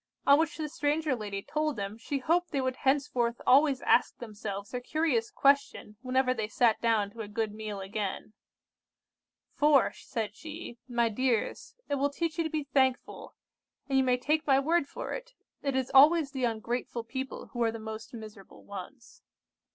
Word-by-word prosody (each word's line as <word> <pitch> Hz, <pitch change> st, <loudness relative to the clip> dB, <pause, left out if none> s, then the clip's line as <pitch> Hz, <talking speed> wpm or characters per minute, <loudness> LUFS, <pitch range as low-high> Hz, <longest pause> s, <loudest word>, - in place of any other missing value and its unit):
On 280 Hz, +1 st, +7 dB
which 320 Hz, 0 st, 0 dB
the 310 Hz, -1 st, -3 dB
stranger 295 Hz, 0 st, 0 dB
lady 205 Hz, -3 st, -5 dB
told 305 Hz, -1 st, -1 dB
them 200 Hz, 0 st, -4 dB
she 275 Hz, +5 st, -3 dB
hoped 340 Hz, +6 st, +1 dB
they 285 Hz, -, -1 dB
would 260 Hz, -1 st, -1 dB
henceforth 255 Hz, -4 st, +1 dB
always 275 Hz, 0 st, +4 dB
ask 245 Hz, -, +3 dB
themselves 205 Hz, -3 st, -6 dB
her 250 Hz, -, -2 dB
curious 250 Hz, -4 st, 0 dB
question 275 Hz, -6 st, +1 dB
whenever 255 Hz, 0 st, +1 dB
they 220 Hz, -4 st, -3 dB
sat 225 Hz, 0 st, +2 dB
down 220 Hz, -3 st, +2 dB
to 230 Hz, -, -8 dB
a 210 Hz, -, -6 dB
good 215 Hz, 0 st, -2 dB
meal 215 Hz, -2 st, -5 dB
again. 200 Hz, +1 st, -4 dB, 1.2 s
'For,' 290 Hz, -3 st, +4 dB
said 220 Hz, -4 st, -5 dB
she, 305 Hz, -5 st, -9 dB
'my 235 Hz, -2 st, +1 dB
dears, 240 Hz, 0 st, -1 dB
it 285 Hz, -1 st, -1 dB
will 285 Hz, +1 st, +2 dB
teach 330 Hz, +3 st, -3 dB
you -, -, +3 dB
to 320 Hz, -, -2 dB
be 310 Hz, -1 st, -2 dB
thankful; 265 Hz, -2 st, 0 dB, 0.5 s
and 275 Hz, -, -1 dB
you 265 Hz, -, +5 dB
may 250 Hz, -1 st, +2 dB
take 305 Hz, +5 st, 0 dB
my 270 Hz, -1 st, +5 dB
word 320 Hz, +1 st, +1 dB
for -, -, -6 dB
it, -, -, -8 dB, 0.3 s
it 275 Hz, -2 st, -1 dB
is 265 Hz, -1 st, -1 dB
always 295 Hz, +2 st, +6 dB
the 265 Hz, -2 st, -1 dB
ungrateful 235 Hz, +1 st, -3 dB
people 260 Hz, +3 st, -6 dB
who 240 Hz, -, -3 dB
are 230 Hz, -1 st, +3 dB
the 230 Hz, -, -6 dB
most 220 Hz, 0 st, -7 dB
miserable 215 Hz, -4 st, -11 dB
ones. 200 Hz, +6 st, -10 dB
255 Hz, 180 wpm, -29 LUFS, 225-285 Hz, 1.2 s, On